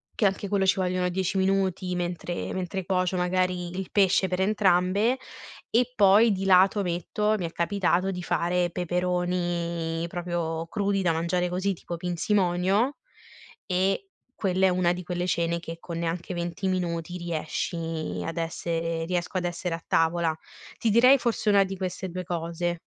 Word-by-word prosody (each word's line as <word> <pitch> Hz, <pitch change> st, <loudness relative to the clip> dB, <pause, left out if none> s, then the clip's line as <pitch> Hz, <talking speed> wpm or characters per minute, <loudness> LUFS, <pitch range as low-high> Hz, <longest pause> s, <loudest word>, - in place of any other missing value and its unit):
che 215 Hz, -, +1 dB
anche 195 Hz, +1 st, 0 dB
quello 195 Hz, -1 st, +1 dB
ci 190 Hz, -, +4 dB
vogliono 180 Hz, 0 st, 0 dB
10 190 Hz, +2 st, -1 dB
minuti 190 Hz, -1 st, +1 dB
mentre 175 Hz, 0 st, -3 dB
mentre 185 Hz, 0 st, -3 dB
cuocio 185 Hz, -1 st, 0 dB
magari 180 Hz, 0 st, 0 dB
il 190 Hz, -2 st, -4 dB
pesce 190 Hz, -2 st, +3 dB
per 180 Hz, -, -1 dB
entrambe 195 Hz, +3 st, +2 dB, 0.5 s
e 245 Hz, +2 st, +2 dB
poi 210 Hz, +1 st, +6 dB
di 195 Hz, 0 st, -2 dB
lato 190 Hz, +2 st, +5 dB
metto, 185 Hz, +5 st, 0 dB
mi 180 Hz, -, -3 dB
è 165 Hz, -, -4 dB
capitato 185 Hz, +1 st, +1 dB
di 180 Hz, -, -5 dB
fare 175 Hz, +1 st, +1 dB
peperoni 175 Hz, -2 st, -1 dB
proprio 170 Hz, -2 st, -3 dB
crudi 200 Hz, 0 st, 0 dB
da 175 Hz, -3 st, +2 dB
mangiare 175 Hz, +2 st, 0 dB
così, 190 Hz, +2 st, 0 dB
tipo 170 Hz, 0 st, -7 dB
pinzimonio, 185 Hz, -, +1 dB, 0.7 s
e 190 Hz, -, 0 dB, 0.3 s
quella 190 Hz, -1 st, +2 dB
è -, -, +4 dB
una 180 Hz, -1 st, +2 dB
di 180 Hz, -, -6 dB
quelle 180 Hz, 0 st, -2 dB
cene 170 Hz, -1 st, 0 dB
che 165 Hz, 0 st, -7 dB
con 170 Hz, -1 st, -6 dB
neanche 170 Hz, +2 st, -3 dB
20 175 Hz, +2 st, -3 dB
minuti 175 Hz, -1 st, -2 dB
riesci 165 Hz, -1 st, -3 dB
ad 165 Hz, +1 st, -5 dB
essere 165 Hz, 0 st, -2 dB
riesco 180 Hz, +1 st, -2 dB
ad 180 Hz, -, -1 dB
essere 175 Hz, 0 st, -2 dB
a 165 Hz, -, -10 dB
tavola. 165 Hz, 0 st, +2 dB, 0.5 s
Ti 230 Hz, -, +1 dB
direi 250 Hz, +5 st, +7 dB
forse 235 Hz, -3 st, 0 dB
1 200 Hz, -1 st, +6 dB
di 190 Hz, 0 st, -5 dB
queste 185 Hz, 0 st, -4 dB
2 185 Hz, +1 st, -5 dB
cose 170 Hz, 0 st, -3 dB
180 Hz, 160 wpm, -26 LUFS, 170-190 Hz, 0.7 s, direi